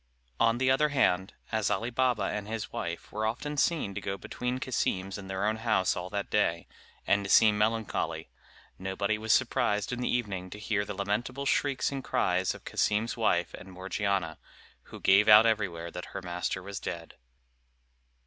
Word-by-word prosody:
On 115 0 +3
the 130 +1 +2
other 150 +3 +3
hand, 95 -10 +1 0.2
as 110 -3 +1
Ali 110 +4 -1
Baba 125 -2 +1
and 105 -1 -3
his 110 0 -5
wife 85 0 -5
were 110 +1 -1
often 145 +7 -3
seen 145 -7 +1
to 100 - -5
go 95 0 -3
between 125 +5 -3
Cassim's 95 -7 -1
and 95 -2 -8
their 95 +1 -1
own 110 +1 +1
house 110 -5 +1
all 90 0 -5
that 100 0 -4
day, 85 -5 +1 0.4
and 100 0 +2
to 100 - -5
seem 110 0 +6
melancholy, 110 +1 -1 0.5
nobody 100 +3 -1
was 110 0 -1
surprised 105 +2 +2
in 125 - -3
the - - -1
evening 100 -7 -2
to 105 - -8
hear 105 -1 -1
the 105 - -5
lamentable 110 +8 -2
shrieks 140 -1 +1
and 135 -1 -4
cries 90 +1 +1
of - - -14
Cassim's 110 +2 0
wife 100 -7 +1
and 95 - -10
Morgiana, 95 -2 -2 0.5
who - - -11
gave 100 +2 +5
out 105 +1 +9
everywhere 95 -7 0
that 90 +1 -6
her 95 - -3
master 90 +1 -3
was 100 0 -6
dead. 85 -1 -6
105 Hz, 180 wpm, -29 LUFS, 95-115 Hz, 0.5 s, out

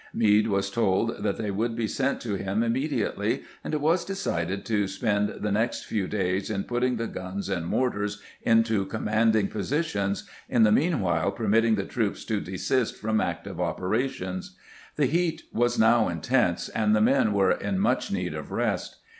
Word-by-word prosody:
Meade 105 -1 +4
was 100 -1 0
told 115 +1 +1
that - - -1
they 105 -2 -2
would 115 +4 -1
be 115 -2 -1
sent 135 +5 -1
to 110 -4 -4
him 100 +2 -1
immedi 130 +3 0
ately, - - -2 0.2
and - - -4
it 150 - -1
was 165 +4 +2
decided 100 - -2
to 105 -3 +1
spend 105 +1 0
the 105 - -3
next 115 +4 0
few 100 -4 -2
days 95 -1 -1
in 100 -2 -1
putting 125 +1 0
the 115 0 -2
guns 95 -1 -5
and 85 -4 -2
mortars 105 -4 -1 0.2
into 115 -3 +3
commanding' 110 0 +2
posi 125 - -1
tions, 100 -9 -2 0.2
in 115 - +4
the 105 - +5
meanwhile 100 - +2
permitting 110 +1 +2
the 100 -2 -2
troops 110 -3 -2
to 110 -3 0
desist 110 +7 -1
from 110 0 0
active - - -4
operations. 95 -3 -2 0.4
The 150 - +2
heat 170 +4 0
was 120 +1 +1
now 110 -1 +4
intense, 90 +2 +1
and 110 -1 +2
the 105 - +3
men 110 - +4
were 100 -2 +3
in 195 - -1
much 200 +4 +1
need - - -2
of - - -7
rest. - - -1
110 Hz, 180 wpm, -26 LUFS, 100-120 Hz, 0.4 s, the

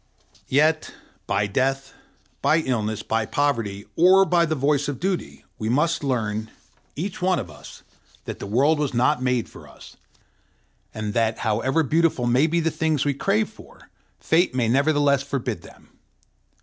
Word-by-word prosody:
Yet, 155 +3 +1 0.3
by 100 +1 +1
death, 135 +5 -1 0.5
by 160 +1 +3
illness, 110 -6 -2
by 110 -1 -1
poverty, 115 -8 -1
or 185 +3 +6
by 170 -2 +2
the 155 - -1
voice 140 0 +1
of 145 -3 -4
duty, 190 0 -3
we 110 - -2
must 150 +6 +1
learn, 110 -5 -2 0.5
each 180 +6 -5
one 185 0 +2
of 95 - -5
us, 75 - -13 0.4
that - - -6
the - - -6
world 140 +9 +2
was 145 -4 -1
not 125 +3 +2
made 125 -2 0
for - - -14
us, - - -15 0.9
and 105 -1 -4
that, 115 -1 +1
however 130 +8 +1
beautiful 155 -3 +1
may 125 +6 +3
be 170 +1 +1
the 165 0 0
things 155 -2 0
we 145 - +1
crave 200 +9 0
for, 220 - -17 0.3
Fate 165 -4 +1
may 125 -3 +1
nevertheless 140 +2 +2
forbid 130 -8 -3
them. - - -17
140 Hz, 160 wpm, -23 LUFS, 115-160 Hz, 0.9 s, or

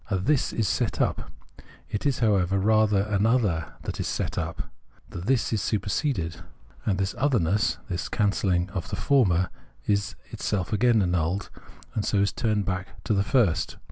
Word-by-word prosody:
A 95 - +1
This 130 +9 +1
is 110 -3 0
set 80 - 0
up; - - 0 0.6
it 105 +7 -2
is, 140 - +1
however, 100 -3 +2
rather 105 0 +3
an 105 0 +1
other 105 -10 +1
tliat - - -5
is - - -1
set - - -2
up; - - -3 0.4
the - - -7
This 115 +6 +1
is 110 - +1
superseded: 100 - -1 0.5
and 95 -3 +2
this 95 +1 -1
otherness, 105 - +2
this 90 -2 -3
cancelhng 95 -3 +1
of 95 -4 -4
the - - -2
former, 95 -11 +2 0.3
is 100 -1 0 0.2
itself 95 -1 -2
again 110 0 +4
annulled, 90 +2 -1 0.4
and 105 - -1
so 100 -1 +2
turned 105 -1 0
back 95 -2 -4
to - - 0
the 100 - +3
first. 100 -4 +1
100 Hz, 165 wpm, -26 LUFS, 90-110 Hz, 0.6 s, again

